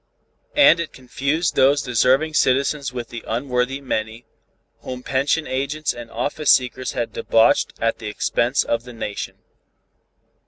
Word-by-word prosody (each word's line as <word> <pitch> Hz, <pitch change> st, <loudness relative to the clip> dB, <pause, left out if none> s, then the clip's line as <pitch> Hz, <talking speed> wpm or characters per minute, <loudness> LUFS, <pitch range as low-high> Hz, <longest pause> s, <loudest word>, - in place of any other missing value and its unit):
And 285 Hz, -12 st, +6 dB
it 170 Hz, -, -4 dB
confused 140 Hz, +6 st, -2 dB
those 140 Hz, +2 st, +4 dB
deserving 130 Hz, +5 st, +2 dB
citizens 140 Hz, 0 st, +1 dB
with 120 Hz, -2 st, -6 dB
the 120 Hz, -, -7 dB
unworthy 125 Hz, +2 st, -1 dB
many, 110 Hz, -3 st, -4 dB, 0.5 s
whom 125 Hz, 0 st, -7 dB
pension 140 Hz, +5 st, 0 dB
agents 140 Hz, +3 st, -2 dB
and 120 Hz, -1 st, -9 dB
office 145 Hz, +6 st, -2 dB
seekers 130 Hz, 0 st, +2 dB
had 120 Hz, -, -3 dB
debauched 115 Hz, 0 st, +3 dB
at 115 Hz, 0 st, 0 dB
the -, -, -6 dB
expense 120 Hz, +4 st, 0 dB
of 115 Hz, -, -1 dB
the 125 Hz, 0 st, -11 dB
Nation. 105 Hz, -3 st, -5 dB
130 Hz, 135 wpm, -21 LUFS, 120-140 Hz, 0.5 s, And